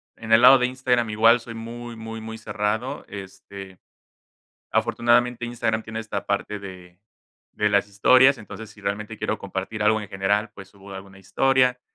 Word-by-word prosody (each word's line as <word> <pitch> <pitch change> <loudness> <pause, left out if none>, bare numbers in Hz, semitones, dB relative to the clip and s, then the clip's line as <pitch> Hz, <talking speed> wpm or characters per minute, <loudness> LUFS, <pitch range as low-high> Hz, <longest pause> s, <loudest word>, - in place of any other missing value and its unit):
en 110 -1 -8
el 115 +1 +7
lado 130 +2 +9
de 125 - +2
Instagram, 125 -2 0
igual 115 +3 +4
soy 115 0 -9
muy, 115 +1 -8
muy, 115 0 -7
muy 110 0 -7
cerrado, 110 +6 -3
este. 95 -1 -10 0.9
Afortunadamente, 120 0 +1
Instagram 110 -2 -2
tiene 110 0 -7
esta 110 -1 -5
parte 100 +1 -2
de 90 -2 -12 0.5
de 105 - +1
las 100 0 +2
historias, 130 +7 +5
entonces, 110 0 -10
si 105 - -17
realmente 105 +2 -4
quiero - - -2
compartir 100 +3 -5
algo 110 +1 +3
en 105 - -8
general, 100 +3 0
pues, 95 0 -12
subo 100 0 -14
alguna 95 0 -11
historia, 125 +5 +1
110 Hz, 165 wpm, -23 LUFS, 100-120 Hz, 0.9 s, lado